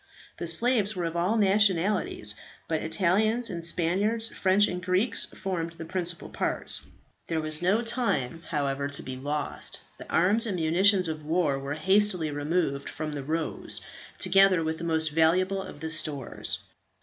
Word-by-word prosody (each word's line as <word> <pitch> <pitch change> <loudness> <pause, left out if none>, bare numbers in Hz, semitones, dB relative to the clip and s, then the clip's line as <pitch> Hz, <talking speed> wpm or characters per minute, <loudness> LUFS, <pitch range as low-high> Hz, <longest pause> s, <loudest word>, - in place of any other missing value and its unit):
The 170 - -4
slaves 215 +4 +4
were 175 -2 -2
of 165 0 -4
all 180 +6 +1
nationalities, 195 - +3 0.3
but 160 -1 -1
Italians 210 +8 +1
and 170 -1 -4
Spaniards, 200 +7 +1
French 195 +2 +3
and 180 0 -4
Greeks, 185 +5 +1
formed 170 -3 -4
the 165 0 -9
principal 175 0 -3
part. - - -3 0.5
There 165 - -1
was 155 0 -1
no 200 +6 +2
time, 225 - -1
however, 140 -2 -1
to 145 0 -2
be 130 - -5
lost; 145 +3 -4 0.2
the - - -10
arms 205 +7 +2
and 200 - -2
munitions 180 +3 +3
of 155 -1 -5
war 155 -3 0
were 140 +1 -4
hastily 185 -1 +2
removed 145 -1 -1
from 155 -1 -5
the 145 -1 -4
"Rose," 160 +3 -3 0.4
together 190 -2 +4
with 160 0 -3
the - - -6
most 160 -1 +1
valuable 185 +5 +2
of 150 - -10
the 160 0 -3
stores. 150 -5 0
170 Hz, 160 wpm, -27 LUFS, 155-195 Hz, 0.5 s, slaves